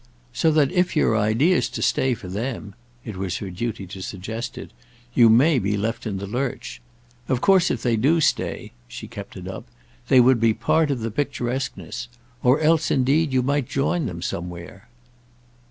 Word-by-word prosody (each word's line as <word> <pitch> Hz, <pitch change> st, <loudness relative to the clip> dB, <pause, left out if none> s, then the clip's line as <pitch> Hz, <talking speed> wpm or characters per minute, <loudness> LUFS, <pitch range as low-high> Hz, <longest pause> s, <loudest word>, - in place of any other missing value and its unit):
So 160 Hz, +7 st, +2 dB
that 150 Hz, -3 st, +3 dB
if 180 Hz, -1 st, +1 dB
your 150 Hz, -7 st, +3 dB
idea's 115 Hz, -, +2 dB
to -, -, -4 dB
stay 130 Hz, -1 st, +2 dB
for 95 Hz, -, -10 dB
them"—it 115 Hz, +2 st, -7 dB
was 95 Hz, -1 st, -2 dB
her 100 Hz, -2 st, -6 dB
duty 110 Hz, +1 st, -4 dB
to 95 Hz, +1 st, -9 dB
suggest 110 Hz, +6 st, -6 dB
it—"you 120 Hz, -1 st, 0 dB
may 130 Hz, +6 st, +5 dB
be 105 Hz, 0 st, -1 dB
left 115 Hz, +4 st, -3 dB
in 100 Hz, -3 st, -3 dB
the 100 Hz, -, -5 dB
lurch. 120 Hz, -, -4 dB, 0.5 s
Of 130 Hz, -, +1 dB
course 190 Hz, +2 st, +4 dB
if 120 Hz, -, -2 dB
they 120 Hz, -2 st, +2 dB
do 145 Hz, +9 st, +3 dB
stay"—she -, -, -3 dB
kept -, -, -9 dB
it -, -, -8 dB
up—"they 125 Hz, +2 st, -2 dB
would 125 Hz, 0 st, +5 dB
be 115 Hz, -1 st, +3 dB
part 150 Hz, +7 st, +2 dB
of 135 Hz, -4 st, -1 dB
the 115 Hz, 0 st, -3 dB
picturesqueness. 130 Hz, -1 st, -3 dB, 0.3 s
Or 125 Hz, +4 st, +4 dB
else 160 Hz, +1 st, +3 dB
indeed 140 Hz, +4 st, +2 dB
you 130 Hz, -1 st, +2 dB
might 140 Hz, -1 st, 0 dB
join 140 Hz, +2 st, 0 dB
them 85 Hz, -4 st, -6 dB
somewhere." 90 Hz, +6 st, -6 dB
120 Hz, 170 wpm, -23 LUFS, 105-135 Hz, 0.5 s, may